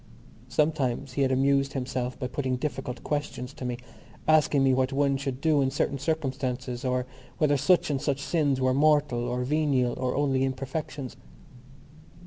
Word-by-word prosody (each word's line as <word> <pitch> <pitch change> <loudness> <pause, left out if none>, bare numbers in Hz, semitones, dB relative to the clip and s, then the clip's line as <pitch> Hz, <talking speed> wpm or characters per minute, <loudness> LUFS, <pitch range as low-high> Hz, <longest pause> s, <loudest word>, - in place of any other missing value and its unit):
Sometimes 135 -2 0
he 140 - -1
had 135 -1 +3
amused 135 +1 +2
himself 125 -1 -3
by - - -4
putting 130 0 -1
difficult 130 -2 -4
questions 145 -3 -3
to - - -9
me, 125 -1 -2 0.5
asking 155 -3 +4
me 135 -1 +4
what 130 0 +1
one 140 0 +2
should 135 -1 -3
do 150 -1 +3
in 135 - +2
certain 140 0 -1
circumstances 130 -4 -2
or 125 -1 0 0.3
whether 150 -2 +3
such 150 +3 +3
and 135 -2 -1
such 140 -2 0
sins 140 -2 +1
were 130 0 +2
mortal 145 -3 +3
or 125 +1 -2
venial 135 -3 +1
or 130 -1 -1
only 135 -2 +1
imperfections. 135 0 -4
135 Hz, 160 wpm, -27 LUFS, 130-145 Hz, 0.5 s, asking